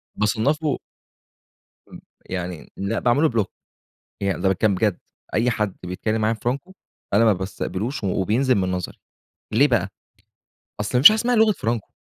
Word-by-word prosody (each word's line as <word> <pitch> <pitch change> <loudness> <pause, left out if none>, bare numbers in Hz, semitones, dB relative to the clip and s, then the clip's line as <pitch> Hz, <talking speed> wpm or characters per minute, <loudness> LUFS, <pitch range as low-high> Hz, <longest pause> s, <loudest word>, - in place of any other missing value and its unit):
بصنّفه 135 +8 0 1.1
امم. - - -11 0.3
يعني 90 -2 -5
لا 100 +4 -2
باعمل 125 +6 +2
له 160 - +5
block - - -10 0.8
يعني 100 -1 -1
ده 95 - +3
باتكلّم 95 +2 +2
بجد، 105 -1 0 0.4
أي 115 +3 +2
حد 105 -5 -2
بيتكلّم 110 +5 -2
معايا 110 +1 +1
فرانكو 135 +10 -3 0.4
أنا 115 +3 +5
ما 110 - +5
بستقبلوش 100 +6 -4
و - - +1
وبينزِل 110 +8 +1
من 95 -2 0
نظري، 90 -1 -4 0.5
ليه 140 +7 +5
بقى، 105 -6 +1 0.9
أصل 105 +4 0
ما - - +1
فيش 155 - +12
حاجة 215 - +2
إسمها 245 +1 +1
لغة 220 -1 +5
فرانكو، 115 - -3
110 Hz, 160 wpm, -22 LUFS, 95-130 Hz, 1.1 s, فيش